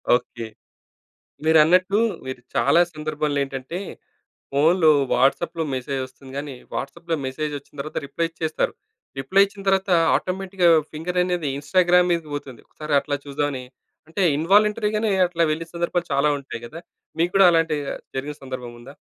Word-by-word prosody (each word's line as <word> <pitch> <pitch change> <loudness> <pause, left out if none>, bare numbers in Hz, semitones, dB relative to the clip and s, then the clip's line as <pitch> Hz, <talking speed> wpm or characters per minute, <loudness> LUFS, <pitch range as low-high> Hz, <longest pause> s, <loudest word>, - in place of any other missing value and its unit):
Okay. 120 -2 -4 1.0
మీరన్నట్లు, 180 +6 +5 0.3
మీరు 130 -1 -6
చాలా 175 - +4
సందర్భాల్లో 150 -1 -2
ఏంటంటే, 135 +6 -5 0.7
ఫోన్‌లో 160 +3 +5 0.2
వాట్సప్‌లో 160 +6 +1
మెసేజ్ 130 +1 -3
వస్తుంది 130 +1 -15
కానీ, 140 -2 -5 0.2
వాట్సాప్‌లో 165 +4 -3
మెసేజ్ 150 +3 -3
వచ్చిన 140 +1 -15
తర్వాత 155 - -7
రిప్లై 165 +4 -2
ఇచ్చేస్తారు. 160 -1 -2 0.5
రిప్లై 195 +9 +4
ఇచ్చిన 200 0 -12
తర్వాత, 195 0 +1 0.2
ఆటోమేటిక్‌గా 185 +3 +1 0.2
ఫింగరనేది 180 -1 -1
ఇన్‌స్టాగ్రామ్ 180 +4 +3
మీదకి 165 -3 -3
పోతుంది. 130 -5 -8
ఒకసారి 150 -1 -3
అట్లా 145 -1 -2
చూద్దామని 140 -2 -2 0.5
అంటే, 195 +4 -3 0.2
ఇన్వాలంటరీగానే 210 +4 +2 0.2
అట్లా 170 -1 0
వెళ్ళిన 165 +2 -4
సందర్భాలు 170 0 -1
చాలా 140 +2 +3
ఉంటాయి 135 -4 -8
కదా! 155 +8 -9 0.4
మీకు 175 +2 +2
కూడా 195 -1 +7
అలాంటివి 165 -3 +1 0.3
జరిగిన 145 +2 -4
సందర్భం 130 -2 -6
ఉందా? 135 +4 -12
155 Hz, 130 wpm, -23 LUFS, 140-180 Hz, 1.0 s, కూడా